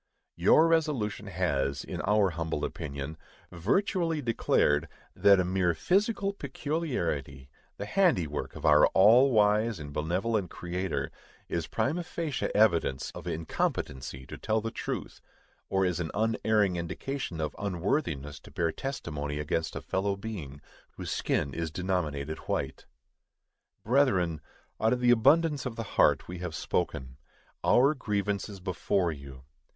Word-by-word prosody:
Your 160 - +5
resolution 145 -11 0
has, 70 -7 -1
in - - -5
our 105 -1 +3
humble 80 -2 -2
opinion, 70 +2 -6 0.3
virtually 165 - 0
declared, 115 - +2 0.3
that 100 -1 +6
a 90 - +2
mere 90 -2 +1
physical 200 - +1
peculiarity, 125 - -3 0.3
the 100 - -4
handiwork 105 - +1
of - - -6
our 75 -1 +7
all 115 +8 +7
wise 110 -1 +3
and 75 -2 -8
benevolent 90 +6 -1
Creator, 90 +2 -3 0.4
is 85 -2 -2
prima 150 +11 0
facie 165 -5 -3
evidence 85 -11 +2
of - - -9
incompetency 65 -4 -3
to - - -9
tell 110 +1 +1
the 115 +1 -4
truth, - - -5 0.5
or 95 0 +2
is 90 -1 0
an 85 -2 -2
unerring 110 -3 +2
indication 85 +3 -4
of 75 -1 -2
unworthiness 85 - -2
to - - -15
bear 85 -1 0
testimony 75 - -4
against 80 +2 -2
a - - -4
fellow 100 +1 -1
being 90 -10 -7 0.3
whose - - -6
skin 70 - 0
is 80 -1 -2
denominated 80 -4 -2
white. - - -2 1.0
Brethren, 95 - +2 0.4
out 110 +2 +4
of 125 - -1
the 125 -1 +4
abundance 140 +4 +4
of 120 - -6
the 115 - -3
heart - - +4
we 90 0 -6
have 90 -3 -4
spoken. 65 0 -2 0.5
_Our 140 +5 +5
grievance 105 -4 -2
is 100 -2 -9
before 90 -1 0
you! 70 -3 -10
95 Hz, 135 wpm, -29 LUFS, 80-115 Hz, 1.0 s, our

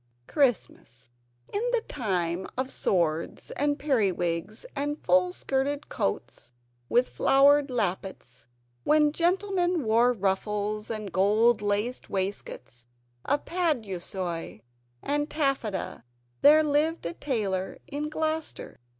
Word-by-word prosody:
Christmas 210 - -1 0.4
In 410 - 0
the 480 - +2
time 185 - -2
of 260 +1 -1
swords 165 -3 -1
and 290 0 0
peri 255 -10 +2
wigs 175 - -3
and 290 +1 -2
full 180 0 +4
skirted 275 +7 -2
coats 100 +4 -3 0.4
with 245 +1 +3
flowered 280 +1 +4
lappets 190 - -3 0.4
when 300 -1 +4
gentlemen 355 0 +1
wore 230 +2 +4
ruffles, 210 0 -1
and 215 -3 -4
gold 210 +5 +3
laced 210 +4 -1
waistcoats 190 -11 -4 0.4
of 290 +1 0
paduasoy 195 - -2 0.4
and 290 +1 0
taffeta 270 - -2 0.4
there 305 +2 +7
lived 305 - +1
a 170 - -2
tailor 195 -8 -2
in 295 +1 -4
Gloucester. 315 0 -3
230 Hz, 105 wpm, -27 LUFS, 190-290 Hz, 0.4 s, there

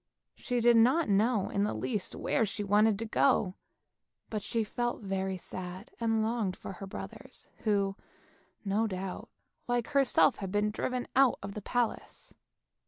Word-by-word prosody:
She 245 -2 -2
did 240 0 +6
not 255 +6 +4
know 210 +1 +2
in 200 - +1
the 210 - -1
least 210 -6 -2
where - - +1
she 215 0 -3
wanted 205 +1 +4
to 225 - -4
go, 220 -4 +2 0.8
but 215 -1 -2
she 225 +2 -1
felt 240 +1 -3
very 190 -1 -2
sad, 185 +5 -8
and 225 -1 +1
longed 220 -4 -1
for - - -8
her 195 +1 -8
brothers, 95 - -8 0.2
who, 200 -2 +2 0.7
no 210 +3 +1
doubt, 190 -1 -5 0.4
like 245 0 0
herself 275 -4 +4
had 195 -2 -5
been 205 +1 +1
driven 250 +3 -2
out 265 -1 +5
of 200 0 -5
the 210 - -6
palace. 240 +2 -3
215 Hz, 160 wpm, -30 LUFS, 195-235 Hz, 0.8 s, did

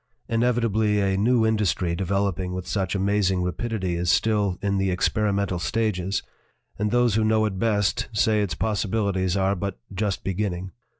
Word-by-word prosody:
Inevitably 115 -3 +1
a 95 -1 +1
new 115 +3 +3
industry 105 -5 +1
de 95 - -2
veloping 95 -1 -1
with 90 -1 -5
such 95 -2 -1
amazing 95 -2 +1
rapidity 95 0 -2
is 85 0 -1
still 100 -1 +2
in 100 -1 0
the 95 0 +1
experimental 100 0 0
stages, 100 -2 -1 0.6
and 105 +1 +1
those 120 0 +3
who 110 +1 +2
know 110 0 +3
it 95 -3 -3
best 105 -7 +1
say 105 0 +2
its 100 -5 -2
possibilities 100 -3 0
are 95 +1 +2
but 100 -2 -4 0.2
just 100 0 -2
beginning. 95 -1 -2
100 Hz, 160 wpm, -24 LUFS, 95-110 Hz, 0.6 s, new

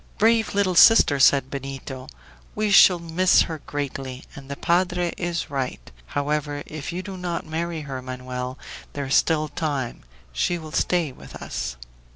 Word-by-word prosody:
"Brave 220 -4 +3
little 200 -2 +2
sister!" 170 -6 +7
said 135 0 +4
Benito, 135 -1 -6 0.5
"we 215 -1 0
shall 185 -2 +8
miss 170 +2 +3
her 160 -2 -6
greatly, 135 -2 -5
and 140 -3 -11
the 140 - -4
padre 175 +1 +1
is 175 -4 -3
right. 130 - -4 0.2
However, 145 - -2
if 155 +1 -6
you 180 +2 -4
do 195 -1 -7
not 175 -2 -3
marry 165 +1 -3
her, 135 -3 -6
Manoel 125 0 -5 0.4
there 140 -1 -3
is 135 - -2
still 155 0 +3
time 145 -6 -3 0.3
she 65 - 0
will 155 -2 -9
stay 170 -2 +1
with - - -13
us." 60 -1 -5
150 Hz, 160 wpm, -24 LUFS, 135-175 Hz, 0.5 s, shall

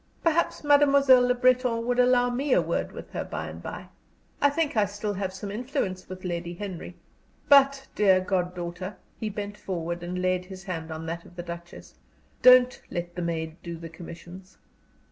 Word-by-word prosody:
"Perhaps 330 -1 +1
Mademoiselle 280 -3 +6
Le 250 - +2
Breton 250 -2 +2
will 245 0 0
allow 245 0 +3
me 265 +2 0
a - - +5
word - - -2
with - - -10
her - - -3
by - - -5
and - - -9
by. - - -7 0.5
I 285 - +6
think 300 -1 -1
I - - +3
have 205 -2 +2
still 205 0 -3 0.2
some 190 +2 -7
influence 215 - -3
with 185 0 -8
Lady 175 0 -3
Henry. 185 -2 -7 0.5
But, 275 -1 +5
dear 190 -3 +4
goddaughter" 180 0 -3 0.2
he 220 - -2
bent 205 0 -6
forward 170 -2 -4
and 180 +1 -4
laid 185 0 0
his 190 0 -10
hand 165 -4 -5
on 160 0 -6
that 170 +1 -4
of 175 - -17
the 175 - -6
Duchess 170 0 -9 0.5
"don't 255 0 +7
let 175 0 -4
the 180 - -5
maid 165 -1 -3
do 170 -1 -6
the 165 0 -8
commissions." 175 +3 -11
190 Hz, 185 wpm, -27 LUFS, 175-250 Hz, 0.5 s, don't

